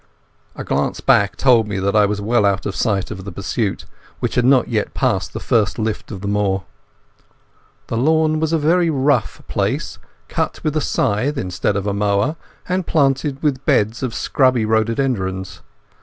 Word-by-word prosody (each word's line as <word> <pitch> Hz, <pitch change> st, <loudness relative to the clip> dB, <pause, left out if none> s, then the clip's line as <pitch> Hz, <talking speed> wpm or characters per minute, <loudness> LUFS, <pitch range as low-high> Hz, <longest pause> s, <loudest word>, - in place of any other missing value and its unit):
A -, -, -6 dB
glance 70 Hz, +1 st, -1 dB
back -, -, +3 dB
told 120 Hz, -5 st, +4 dB
me 100 Hz, -2 st, -3 dB
that 100 Hz, +2 st, 0 dB
I 105 Hz, -1 st, +5 dB
was 105 Hz, 0 st, -2 dB
well 110 Hz, +2 st, +1 dB
out 100 Hz, -1 st, +1 dB
of 100 Hz, -, -3 dB
sight 100 Hz, -5 st, 0 dB
of 95 Hz, -, -7 dB
the 100 Hz, -, -7 dB
pursuit, 100 Hz, +3 st, -3 dB, 0.3 s
which -, -, -2 dB
had 125 Hz, -, +2 dB
not 130 Hz, -1 st, +4 dB
yet 110 Hz, -3 st, -2 dB
passed -, -, 0 dB
the -, -, -5 dB
first 110 Hz, -4 st, +1 dB
lift 110 Hz, -1 st, -3 dB
of 100 Hz, -4 st, -7 dB
the 100 Hz, -, -4 dB
moor. 100 Hz, -2 st, 0 dB, 1.2 s
The 115 Hz, -, -3 dB
lawn 155 Hz, +4 st, +2 dB
was 160 Hz, 0 st, 0 dB
a 165 Hz, -, +3 dB
very 165 Hz, +3 st, +2 dB
rough 135 Hz, -5 st, 0 dB
place, -, -, -2 dB, 0.3 s
cut -, -, -2 dB
with 155 Hz, 0 st, -1 dB
a 155 Hz, -, +1 dB
scythe 130 Hz, +5 st, 0 dB
instead 95 Hz, -1 st, -1 dB
of 100 Hz, -1 st, -2 dB
a 100 Hz, -, 0 dB
mower, 100 Hz, +8 st, +1 dB, 0.3 s
and 185 Hz, 0 st, -1 dB
planted 140 Hz, -1 st, +1 dB
with 140 Hz, -3 st, 0 dB
beds 110 Hz, +3 st, +1 dB
of 130 Hz, -4 st, -3 dB
scrubby 130 Hz, -4 st, +2 dB
rhododendrons. 110 Hz, -, -1 dB
110 Hz, 180 wpm, -19 LUFS, 100-135 Hz, 1.2 s, I